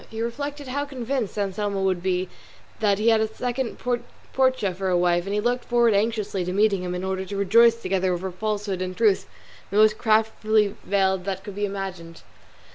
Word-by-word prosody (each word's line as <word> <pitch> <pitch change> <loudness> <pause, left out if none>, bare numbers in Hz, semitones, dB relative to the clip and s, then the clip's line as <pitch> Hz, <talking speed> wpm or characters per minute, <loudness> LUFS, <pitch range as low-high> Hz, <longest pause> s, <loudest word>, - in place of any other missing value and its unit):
He 225 - -7
reflected 285 +5 -4
how 285 +3 -2
convinced 255 -5 -3
Anselmo 200 0 -1
would 185 -2 +1
be 185 0 0 0.5
that 205 -2 +2
he 220 +3 +3
had 225 -1 +4
a 220 - +1
second 245 +3 -3 0.6
Portia 260 -7 +2
for 190 +1 -2
a 180 - +3
wife, 175 0 +2
and 200 - -3
he - - +1
looked 245 +3 0
forward 240 -2 +3
anxiously 210 -2 0
to 180 - -3
meeting 200 0 +2
him 180 0 -3
in 180 - -4
order 190 0 -2
to 200 +1 -6
rejoice 230 +4 +5
together 190 -3 0
over 180 +1 -3
falsehood 205 -1 -3
and 185 0 -4
truth 215 -4 +2 0.4
the 200 - -2
most 215 0 +5
craftily 215 -2 +2
veiled 190 -2 +1
that 190 -1 -3
could 205 - -7
be 205 +1 -1
imagined. 190 -4 -6
205 Hz, 195 wpm, -24 LUFS, 190-225 Hz, 0.6 s, rejoice